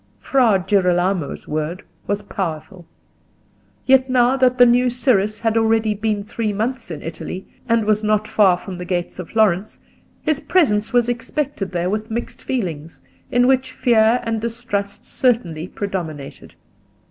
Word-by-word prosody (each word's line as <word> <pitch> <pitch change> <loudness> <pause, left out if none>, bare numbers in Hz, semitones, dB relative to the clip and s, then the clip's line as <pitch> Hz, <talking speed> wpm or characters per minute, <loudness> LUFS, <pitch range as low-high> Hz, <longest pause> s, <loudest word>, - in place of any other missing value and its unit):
Fra 245 -7 +3
Girolamo's 180 -4 +1
word 155 +4 -3 0.2
was 205 0 -1
powerful; 175 -2 -5 1.0
yet 265 0 +4
now 250 0 +3
that 255 -1 +2
the 245 - +8
new 245 +1 +4
Cyrus 215 -4 +1
had 225 -1 +1
already 225 -1 +2
been 210 0 -2
three 215 +1 -3
months 230 +5 -3
in 155 -4 -7
Italy, 165 +3 -6 0.2
and 230 -2 +2
was 215 0 +1
not 215 0 +1
far 190 -4 +4
from 180 0 -8
the - - -4
gates 175 0 -3
of 180 - -7
Florence, 215 -2 +1 0.5
his 310 -2 0
presence 220 - +2
was 245 -1 +3
expected 245 -3 -3
there 175 +1 -1
with 215 +2 -3
mixed 235 +2 -5
feelings, 165 - -4 0.3
in 245 0 +3
which 260 0 +2
fear 235 -2 +3
and 225 -1 -2
distrust 225 -2 -4
certainly 185 -10 0
predominated. 170 -9 -6
215 Hz, 145 wpm, -20 LUFS, 185-245 Hz, 1.0 s, the